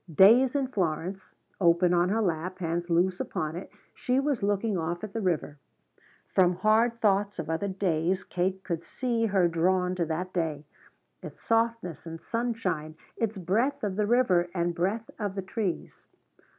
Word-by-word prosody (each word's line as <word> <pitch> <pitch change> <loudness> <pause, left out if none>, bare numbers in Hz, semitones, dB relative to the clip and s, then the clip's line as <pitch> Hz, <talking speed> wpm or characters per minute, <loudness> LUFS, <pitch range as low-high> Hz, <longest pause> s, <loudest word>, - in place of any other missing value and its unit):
"Days 235 - +6
in 275 -2 +2
Florence" 185 -2 -3 0.2
open 175 0 +4
on 175 +1 +3
her 220 +2 +1
lap, 180 0 -2
hands 175 0 -2
loose 180 +2 +2
upon 155 +1 -3
it, 180 - -7 0.2
she 250 +1 0
was 275 -3 0
looking 205 +1 0
off 175 +1 -3
at 210 -2 -6
the 225 - -2
river. 160 -6 -1 0.7
From 180 -1 +4
hard 220 +5 +2
thoughts 205 -1 +2
of 160 -1 -3
other 165 +5 -1
days 185 -1 0
Kate 190 +1 -2
could 170 -3 -3
see 235 -3 -1
her 190 -4 +3
drawn 180 +2 +1
to 180 -2 -1
that 180 +3 -3
day 155 -4 -2 0.6
its - - -10
softness 225 -8 0
and 165 0 -7
sunshine, 220 -11 -2 0.2
its 220 -2 -2
breath 230 +11 0
of 200 -3 -1
the 210 0 0
river 205 -8 +3
and 170 -1 0
breath 195 +6 -1
of 205 -3 -3
the 195 - -3
trees. 190 -2 -4
185 Hz, 165 wpm, -28 LUFS, 170-220 Hz, 0.7 s, Days